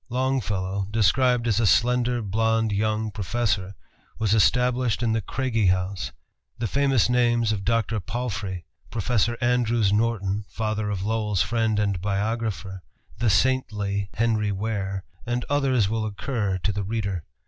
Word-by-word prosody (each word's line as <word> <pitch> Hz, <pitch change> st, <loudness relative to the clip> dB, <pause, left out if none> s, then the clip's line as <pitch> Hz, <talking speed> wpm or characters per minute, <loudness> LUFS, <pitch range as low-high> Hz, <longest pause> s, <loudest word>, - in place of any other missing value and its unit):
Longfellow, 105 Hz, -7 st, -1 dB
described 115 Hz, +3 st, +3 dB
as 110 Hz, -1 st, +2 dB
"a 115 Hz, -, +3 dB
slender, 120 Hz, +3 st, +2 dB
blond 110 Hz, +2 st, +1 dB
young 110 Hz, +1 st, 0 dB
professor," 100 Hz, -2 st, -1 dB, 0.4 s
was 110 Hz, -2 st, +1 dB
established 125 Hz, +1 st, +2 dB
in 115 Hz, -, +2 dB
the 110 Hz, 0 st, +1 dB
Craigie 115 Hz, -1 st, 0 dB
House. 95 Hz, +1 st, 0 dB, 0.5 s
The 120 Hz, -, -2 dB
famous 135 Hz, 0 st, +2 dB
names 120 Hz, -2 st, +2 dB
of 100 Hz, -2 st, -2 dB
Dr. 115 Hz, 0 st, 0 dB
Palfrey, 105 Hz, -, -4 dB, 0.2 s
Professor 115 Hz, +1 st, 0 dB
Andrews 120 Hz, -4 st, +2 dB
Norton, 105 Hz, -2 st, 0 dB
father 110 Hz, -1 st, -2 dB
of 100 Hz, -2 st, -2 dB
Lowell's 105 Hz, -3 st, 0 dB
friend 110 Hz, 0 st, 0 dB
and 100 Hz, -4 st, 0 dB
biographer, 100 Hz, -2 st, -2 dB, 0.4 s
the 120 Hz, -, +2 dB
"saintly" 100 Hz, -3 st, +1 dB
Henry 110 Hz, -2 st, +1 dB
Ware, 100 Hz, -2 st, -3 dB, 0.2 s
and 120 Hz, +1 st, -1 dB
others 130 Hz, -7 st, +2 dB
will 110 Hz, +1 st, -1 dB
occur 105 Hz, -2 st, -2 dB
to 105 Hz, -, +2 dB
the 100 Hz, 0 st, -2 dB
reader. 100 Hz, -4 st, -2 dB
110 Hz, 135 wpm, -25 LUFS, 100-120 Hz, 0.5 s, described